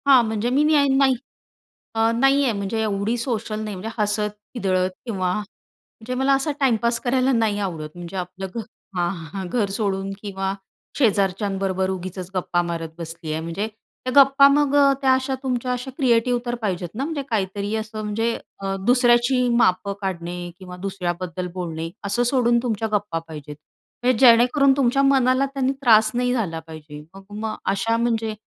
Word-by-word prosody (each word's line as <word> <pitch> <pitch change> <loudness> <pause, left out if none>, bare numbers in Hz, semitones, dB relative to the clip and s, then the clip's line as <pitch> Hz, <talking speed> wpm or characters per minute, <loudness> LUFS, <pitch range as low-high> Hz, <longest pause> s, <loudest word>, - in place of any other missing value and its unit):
हां, 265 -3 +7
म्हणजे 220 +1 -1
मी 275 +4 +3
न्या 300 -1 +4
नाही. 270 -1 +4 0.8
अ, 225 0 +3
नाही 270 +3 +4
आहे 250 -4 +1
म्हणजे 200 +3 -2
एवढी 215 +2 -1
सोशल 225 -3 -3
नाही 215 -2 -4
म्हणजे 195 +4 -5
हसत 210 0 +1 0.2
खिदळत 185 -6 0 0.2
किंवा 185 -6 -1
म्हणजे 220 +3 -9
मला 265 +2 +2
असा 275 +3 +1
टाईम 265 -4 +3
पास 235 0 +1
करायला 255 +1 +2
नाही 220 -4 +1
आवडत. 165 -6 -4
म्हणजे 175 +1 -8
आपलं 185 +1 -5
घ - - -2 0.4
हां, 175 +1 -3
घर 215 -3 0
सोडून 195 -1 -2
किंवा 195 -2 -3 0.4
शेजारच्यांबरोबर 195 -4 +1
उगीचच 185 -1 -5
गप्पा 175 -1 0
मारत 170 -1 -4
बसली 165 -1 -6
आहे. 155 +1 -2
म्हणजे 170 +6 -3 0.4
त्या 255 - -1
गप्पा 275 +1 +6
मग 285 0 +3
अ, 280 -1 +6
त्या 265 -1 +4
अशा 260 +1 0
तुमच्या 250 -1 -1
अशा 250 +2 -5
क्रिएटिव्ह 245 -2 +2
तर 240 0 -1
पाहिजेत 180 -4 -2
ना, 260 - -2
म्हणजे 300 -1 -3
काहीतरी 200 -1 -1
असं 215 0 -4
म्हणजे, 225 +2 -1 0.3
अ, 195 0 -2
दुसऱ्याची 245 +1 +4
मापं 200 -2 +2
काढणे 175 -2 -4 0.2
किंवा 180 -1 -9
दुसऱ्याबद्दल 180 -2 -4
बोलणे, 165 -3 -4 0.2
असं 200 +5 +1
सोडून 240 -1 +3
तुमच्या 225 -2 -1
गप्पा 205 -5 -1
पाहिजेत. 150 -2 -8 0.5
म्हणजे 250 -1 +3
जेणेकरून 250 +4 +5
तुमच्या 275 0 +3
मनाला 265 -1 +3
त्यांनी 270 -1 +1
त्रास 220 -4 +5
नाही 245 0 +1
झाला 190 -10 -2
पाहिजे. 155 -2 -10
मग 195 - -11
म, 220 0 -3
अशा 225 +4 +1
म्हणजे, 225 -2 0
215 Hz, 165 wpm, -22 LUFS, 185-250 Hz, 0.8 s, हां